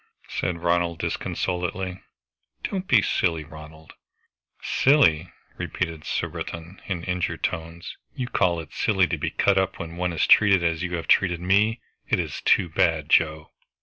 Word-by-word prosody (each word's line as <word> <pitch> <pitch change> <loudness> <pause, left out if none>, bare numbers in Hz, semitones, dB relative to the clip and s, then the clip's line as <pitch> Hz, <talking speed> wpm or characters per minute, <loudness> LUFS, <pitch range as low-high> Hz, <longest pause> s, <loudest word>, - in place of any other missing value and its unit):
said 85 -1 -3
Ronald 85 -1 +1
disconsolately. 90 +2 -3 0.6
"Don't 190 -1 -3
be 110 -5 +5
silly, 80 -4 0
Ronald!" 80 +1 -13 0.7
"Silly!" 90 - +3 0.3
repeated 80 -4 -4
Surbiton 85 +3 -5
in 90 -4 -3
injured 90 -1 -2
tones. 85 +1 -4 0.2
"You 130 - -3
call 90 -8 +1
it 80 - -10
silly 95 -4 +2
to - - -2
be - - -1
cut 100 -1 +2
up 95 0 -1
when 85 +1 -7
one 90 0 -1
is 80 - +1
treated 100 -4 +5
as 85 0 0
you 90 -1 -2
have 85 - -5
treated 90 -3 +3
me! 100 +6 +2 0.3
It - - +3
is - - -4
too 90 - +4
bad, 80 -3 +1
Joe!" 80 -1 +2
85 Hz, 150 wpm, -24 LUFS, 80-95 Hz, 0.7 s, be